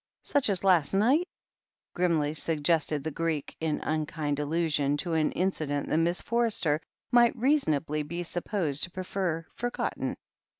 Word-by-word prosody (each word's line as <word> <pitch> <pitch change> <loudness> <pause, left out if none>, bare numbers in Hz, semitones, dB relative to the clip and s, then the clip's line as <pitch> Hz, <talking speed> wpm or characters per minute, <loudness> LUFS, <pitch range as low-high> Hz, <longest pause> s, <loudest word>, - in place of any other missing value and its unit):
"Such 285 -5 +1
as 195 -2 0
last 180 -3 +4
night," 265 - +3 0.7
grimly 165 -4 +1
suggested 155 -1 0
the 160 - -3
Greek, 160 -1 -2
in 160 -2 -1
unkind 155 -2 -2
allusion 150 -2 +1
to 165 +3 -2
an 155 -1 +2
incident 155 -6 -1
that - - +2
Miss 170 +2 0
Forster 220 -10 +1 0.3
might 240 -1 +5
reasonably 160 - +1
be 170 +4 -4
supposed 175 -4 -1
to - - -13
prefer 180 -3 -3
forgotten. 245 0 -3
165 Hz, 135 wpm, -28 LUFS, 150-190 Hz, 0.7 s, might